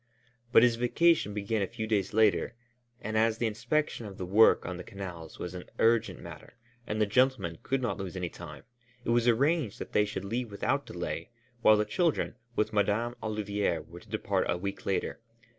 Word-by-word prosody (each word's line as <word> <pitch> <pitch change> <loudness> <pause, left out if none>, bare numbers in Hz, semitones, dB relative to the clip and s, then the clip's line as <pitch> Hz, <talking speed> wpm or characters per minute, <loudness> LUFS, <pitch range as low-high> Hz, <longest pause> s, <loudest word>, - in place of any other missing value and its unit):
But 115 - +7
his 120 -2 +4
vacation 125 +1 +3
began 105 +1 -1
a 95 - 0
few 115 0 -5
days 100 -3 0
later, 110 +1 +3 0.5
and 110 +1 -4
as 110 0 +3
the 120 - 0
inspection 120 +2 -1
of 95 - -10
the 90 - -4
work 105 +5 +5
on 90 0 -4
the 90 - -7
canals 90 -5 -8
was 90 - -5
an 90 -1 -7
urgent 115 0 +2
matter - - -11 0.3
and 110 - -2
the 105 - +4
gentlemen 120 -7 +1
could 135 -1 -1
not 105 -6 -1
lose 95 -1 -5
any 90 -1 -2
time, - - -10 0.4
it - - -2
was 120 0 +3
arranged 135 - +2
that - - -7
they 105 - +3
should 100 -2 -5
leave 120 +3 -2
without 100 - -1
delay, - - -4 0.3
while 110 -2 +6
the 105 - +1
children, 170 - 0 0.2
with 110 +1 0
Madame 105 +4 +1
Olivier, 105 -4 -1
were 85 +2 -10
to 105 - -19
depart 100 -3 -1
a 85 - +1
week 100 +2 -5
later. 95 - -1
105 Hz, 195 wpm, -30 LUFS, 100-120 Hz, 0.5 s, But